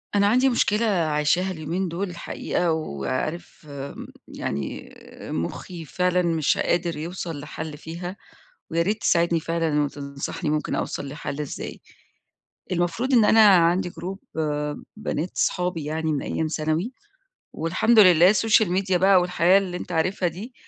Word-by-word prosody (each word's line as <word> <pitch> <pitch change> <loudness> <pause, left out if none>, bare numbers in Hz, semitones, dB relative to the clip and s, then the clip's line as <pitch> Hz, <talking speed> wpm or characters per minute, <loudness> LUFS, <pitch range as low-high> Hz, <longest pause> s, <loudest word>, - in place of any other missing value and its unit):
أنا 200 0 +4
عندي 255 +5 +4
مشكلة 230 -2 +2
عايشاها 175 -1 +1
اليومين 170 +3 -3
دُول 180 +3 -3
الحقيقة 170 0 -2
وعارف 155 - -4
م 140 0 -7 0.2
يعني 70 +1 -5 0.4
مُخّي 165 - -5
فعلًا 180 +3 +1
مش 165 -4 +1
قادر 170 -2 0
يوصل 165 -1 -5
لحل 150 +1 -7
فيها، 170 +4 -7 0.6
ويا 165 0 +2
ريت 210 +5 -1
تساعدني 170 -1 +2
فعلًا 165 -2 0
وتنصحني 140 +1 -4
ممكن 150 -1 -1
أوصل 140 - -3
لحل 145 0 -5
إزاي. 150 - -6 0.9
المفروض 175 +9 0
إن 230 -3 +6
أنا 215 0 +7
عندي 175 -1 +4
group 185 +3 -6 0.8
بنات 180 -5 -3
أصحابي 180 -4 0
يعني 160 +1 -1
من 145 - -1
أيام 160 - -2
ثانوي 155 +8 -1 0.6
والحمد 185 +8 +2
لله 180 -1 +7
الSocial 220 +1 +4 0.2
Media 190 -2 0
بقى 190 +1 +5
والحياة 180 +1 +4
اللي 185 -3 -3
أنت 180 - -7
عارفها 175 +2 +1
دي 200 +10 -9
170 Hz, 135 wpm, -24 LUFS, 155-190 Hz, 0.9 s, أنا